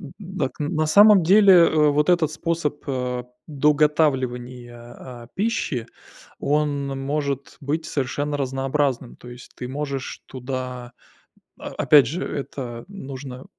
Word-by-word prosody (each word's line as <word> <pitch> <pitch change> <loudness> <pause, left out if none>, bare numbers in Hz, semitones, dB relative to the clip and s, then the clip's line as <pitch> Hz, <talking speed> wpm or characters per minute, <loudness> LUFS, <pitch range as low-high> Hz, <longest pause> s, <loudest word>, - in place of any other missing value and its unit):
М, 170 - -9
м, - - -15
дак 180 - -4
на 155 +1 0
самом 205 +4 +7
деле, 195 +4 +6
э, 160 -3 +5
вот 150 +1 +1
этот 170 -4 +2
способ, 155 -2 -2
э, 125 -2 -3 0.2
доготавливания, 135 -5 0 0.2
а, 120 -2 -10
пищи, 190 - -1 0.5
он 145 -1 0
может 140 -1 -3
быть 150 +3 -2
совершенно 145 +2 -2
разнообразным. 135 -1 -1
То 125 - -13
есть 125 0 -12
ты 125 - -6
можешь 140 -1 -5
туда 125 -1 -6 0.7
о - - -7
опять 145 -4 +5
же, 170 +8 -3
это 125 -4 -6
нужно, 135 -8 -8
140 Hz, 130 wpm, -23 LUFS, 130-155 Hz, 0.7 s, самом